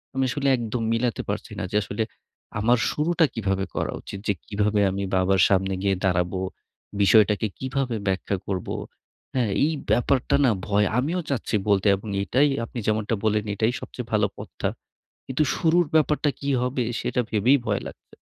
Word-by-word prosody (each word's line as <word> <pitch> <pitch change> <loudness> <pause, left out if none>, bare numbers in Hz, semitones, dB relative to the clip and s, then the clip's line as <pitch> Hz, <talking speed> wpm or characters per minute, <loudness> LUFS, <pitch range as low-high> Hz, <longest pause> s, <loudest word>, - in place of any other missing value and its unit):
আমি 135 - +1
আসলে 140 +2 -1
একদম 115 0 -3
মিলাতে 115 -2 0
পারছি - - -4
না। - - -2
যে - - -4
আসলে 105 +3 -2 0.6
আমার 120 +4 +4
শুরুটা 165 +2 +2
কীভাবে 95 -3 -1
করা - - -1
উচিত? 100 - -8
যে 100 - +3
কিভাবে 105 0 0
আমি 100 +1 -3
বাবার 95 0 +3
সামনে 95 0 +2
গিয়ে 100 0 +2
দাঁড়াবো? 90 0 +1 0.6
বিষয়টাকে 105 +1 +4
কিভাবে 130 -2 -1
ব্যাখ্যা 95 +1 0
করব? 95 -3 -3 0.7
হ্যাঁ? 120 -4 +2 0.2
এই 155 - +1 0.2
ব্যাপারটা 130 +1 +2
না 125 - +5 0.2
ভয়। 105 0 +3
আমিও 165 +8 -1
চাচ্ছি 130 -6 -1
বলতে। 100 0 +3
এবং 100 +3 -9 0.2
এটাই 135 +8 +3 0.2
আপনি 120 - -7
যেমনটা 110 +1 +1
বললেন, 105 -1 +1
এটাই 110 +4 +1
সবচেয়ে - - -7
ভালো - - +3
পথটা। - - -4 0.6
কিন্তু 130 +3 +1
শুরুর 170 +2 +3
ব্যাপারটা 150 -1 +3
কী 140 - -3
হবে? 125 0 0 0.2
সেটা 125 - 0
ভেবেই 115 +6 +4
ভয় 105 -2 0
লাগছে। - - -14
110 Hz, 165 wpm, -24 LUFS, 100-130 Hz, 0.7 s, না